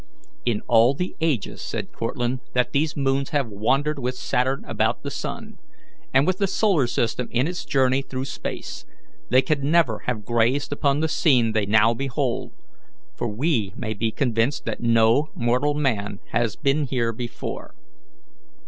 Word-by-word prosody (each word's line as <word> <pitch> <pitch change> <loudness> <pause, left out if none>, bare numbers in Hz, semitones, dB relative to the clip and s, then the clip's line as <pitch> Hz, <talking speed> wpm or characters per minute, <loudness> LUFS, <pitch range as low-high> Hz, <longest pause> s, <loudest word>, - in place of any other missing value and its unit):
"In 110 -3 +1
all 120 +3 +5
the 180 +5 -3
ages," 150 - -1
said - - -4
Cortlandt, 120 +2 -2
"that 125 0 +2
these 150 +2 0
moons 135 0 0
have 145 -6 0
wandered 135 +9 0
with 125 0 -2
Saturn 130 +2 -1
about - - 0
the - - -4
sun, - - -6 0.5
and 135 - +4
with 185 +1 0
the 200 - +2
solar 190 - +2
system 120 +1 -1
in 125 +3 +1
its 180 +1 -4
journey 130 -1 +2
through 130 -1 -5
space, - - -6 0.5
they 130 - +5
can 140 -2 0
never 155 -10 +3
have 110 -5 -2
gazed 120 +5 +1
upon 140 0 +1
the 160 - +2
scene 130 -8 +3
they 110 -2 0
now 110 +2 +5
behold, 135 0 -2 0.6
for 120 - -2
we 115 - 0
may 110 -3 -3
be 110 +2 -1
convinced 125 +1 0
that - - -3
no 115 +4 +4
mortal 125 +5 +1
man 110 -9 -1
has 115 -3 0
been 145 +2 +1
here 120 -3 -1
before." 120 +1 -6
125 Hz, 160 wpm, -24 LUFS, 115-140 Hz, 0.6 s, all